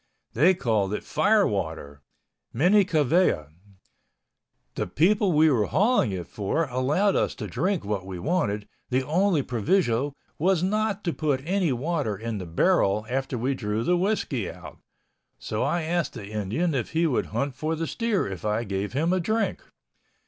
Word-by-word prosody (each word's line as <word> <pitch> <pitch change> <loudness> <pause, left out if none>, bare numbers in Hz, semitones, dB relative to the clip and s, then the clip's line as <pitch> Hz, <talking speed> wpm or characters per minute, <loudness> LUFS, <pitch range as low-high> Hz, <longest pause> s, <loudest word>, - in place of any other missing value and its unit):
They 170 +10 +4
called 110 - 0
it - - -6
fire 205 +7 +3
water—Minnie 100 - -1
Kavea. 155 - +2 1.2
The - - -3
people 190 - +2
we 155 0 +5
were 110 -6 +2
hauling 210 - +2
it 90 -3 -4
for 105 +11 -1
allowed 145 +11 +1
us - - 0
to - - -6
drink 190 - -1
what 100 -2 -2
we 95 -1 -7
wanted, 105 - -1 0.2
the 130 0 0
only 170 0 +2
proviso 130 - 0 0.2
was 180 +1 +2
not 210 +1 0
to 170 - -1
put 140 -4 -1
any 180 -2 +1
water 130 - -1
in 110 0 -4
the 90 - -6
barrel 105 - +2
after 135 -1 -1
we 130 +4 0
drew 110 -3 -2
the 180 - +2
whiskey 200 +5 -1
out, - - -11 0.6
so - - -4
I 170 -1 0
asked 170 +1 -1
the 100 - -8
Indian 110 - -1
if 130 +1 -3
he 165 +1 +2
would 145 -6 0
hunt 140 -1 -2
for 155 +4 -2
the 165 +1 -2
steer 230 +1 -1
if 95 -3 -6
I 105 +2 0
gave 100 0 -3
him 160 +6 +1
a 185 - +2
drink. 220 +6 -1
145 Hz, 165 wpm, -25 LUFS, 105-180 Hz, 1.2 s, we